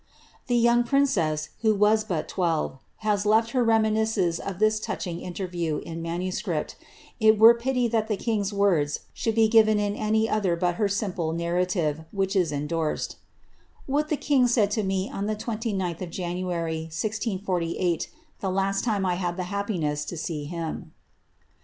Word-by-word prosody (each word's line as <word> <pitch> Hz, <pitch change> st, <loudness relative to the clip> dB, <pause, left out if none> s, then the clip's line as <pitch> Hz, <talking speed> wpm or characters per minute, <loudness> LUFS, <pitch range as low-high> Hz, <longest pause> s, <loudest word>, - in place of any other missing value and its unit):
The 245 Hz, -, +1 dB
young 235 Hz, +1 st, +4 dB
princess, 175 Hz, -, +1 dB
who 220 Hz, -2 st, +3 dB
was 210 Hz, +2 st, +4 dB
but 180 Hz, -8 st, -3 dB
twelve, 165 Hz, -6 st, -1 dB, 0.3 s
has 205 Hz, -2 st, +2 dB
left 220 Hz, +2 st, +3 dB
ber 250 Hz, -2 st, +3 dB
leminisei 220 Hz, -5 st, +2 dB
of 195 Hz, -3 st, -5 dB
this 215 Hz, +1 st, +2 dB
touching 175 Hz, -5 st, -4 dB
interview 175 Hz, -4 st, -3 dB
in 165 Hz, +1 st, -6 dB
manuscript; 175 Hz, 0 st, -3 dB, 0.4 s
it 220 Hz, 0 st, +5 dB
were 225 Hz, +2 st, +9 dB
pity 245 Hz, +1 st, 0 dB
that 220 Hz, -1 st, 0 dB
the 210 Hz, -, -1 dB
1 210 Hz, -2 st, -1 dB
words 165 Hz, -8 st, +2 dB
should 225 Hz, -1 st, -1 dB
be 225 Hz, -1 st, +5 dB
given 215 Hz, -1 st, +5 dB
in 205 Hz, 0 st, -1 dB
any 220 Hz, +1 st, +1 dB
other 200 Hz, -6 st, +1 dB
but 175 Hz, 0 st, 0 dB
her 205 Hz, -, +4 dB
simple 190 Hz, -5 st, -2 dB
narrative, 170 Hz, -2 st, 0 dB
whi 195 Hz, 0 st, -1 dB, 0.2 s
endorsed, 150 Hz, +2 st, -2 dB, 0.7 s
^What 290 Hz, +3 st, +1 dB
the 305 Hz, -, +1 dB
king 270 Hz, -4 st, +3 dB
said 225 Hz, -4 st, +2 dB
tome 210 Hz, -3 st, 0 dB, 0.2 s
on 200 Hz, +1 st, -2 dB
the 215 Hz, -, 0 dB
29th 210 Hz, -6 st, -3 dB
of 180 Hz, -, -4 dB
January^ 170 Hz, -2 st, -3 dB
164( 190 Hz, -, -2 dB
last 195 Hz, +1 st, 0 dB
time 210 Hz, -5 st, 0 dB
I 180 Hz, -, +1 dB
had 175 Hz, 0 st, -2 dB
the 185 Hz, -, -2 dB
happiness 170 Hz, -8 st, -1 dB
to 175 Hz, -, -6 dB
see 150 Hz, -2 st, -4 dB
Atm. 165 Hz, -2 st, -4 dB
195 Hz, 155 wpm, -26 LUFS, 170-220 Hz, 0.7 s, were